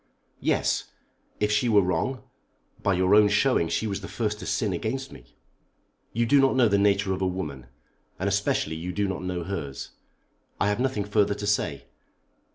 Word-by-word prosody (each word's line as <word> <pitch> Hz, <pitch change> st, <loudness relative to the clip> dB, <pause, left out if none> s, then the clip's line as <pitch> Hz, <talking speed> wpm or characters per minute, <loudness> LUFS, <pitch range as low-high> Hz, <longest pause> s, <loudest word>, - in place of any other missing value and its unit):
"Yes; -, -, +1 dB, 0.5 s
if 105 Hz, 0 st, +1 dB
she 105 Hz, +3 st, +2 dB
were 105 Hz, -3 st, +5 dB
wrong. 90 Hz, +9 st, -1 dB, 0.6 s
By 100 Hz, -2 st, +2 dB
your 95 Hz, +1 st, +3 dB
own 105 Hz, 0 st, +7 dB
showing 105 Hz, -5 st, +2 dB
she -, -, -1 dB
was 100 Hz, -2 st, -3 dB
the 100 Hz, -, -7 dB
first 105 Hz, -2 st, -2 dB
to -, -, -7 dB
sin 105 Hz, -4 st, 0 dB
against 130 Hz, +9 st, -3 dB
me." -, -, -15 dB, 0.8 s
"You 115 Hz, +1 st, +1 dB
do 140 Hz, +5 st, +5 dB
not 135 Hz, -1 st, +3 dB
know 125 Hz, -3 st, +5 dB
the 100 Hz, -1 st, +2 dB
nature 100 Hz, -1 st, +2 dB
of 95 Hz, -, -4 dB
a 95 Hz, -, +2 dB
woman, 75 Hz, -9 st, -5 dB, 0.5 s
and 95 Hz, -, -2 dB
especially 100 Hz, -5 st, 0 dB
you 90 Hz, +3 st, -5 dB
do 100 Hz, +1 st, 0 dB
not 95 Hz, -1 st, -3 dB
know 90 Hz, -1 st, -3 dB
hers. 80 Hz, -8 st, -5 dB, 0.7 s
I 100 Hz, -, +2 dB
have 105 Hz, -, -1 dB
nothing 130 Hz, -5 st, 0 dB
further 105 Hz, 0 st, +1 dB
to 105 Hz, -, -5 dB
say. 105 Hz, 0 st, -1 dB
100 Hz, 185 wpm, -26 LUFS, 90-105 Hz, 0.8 s, own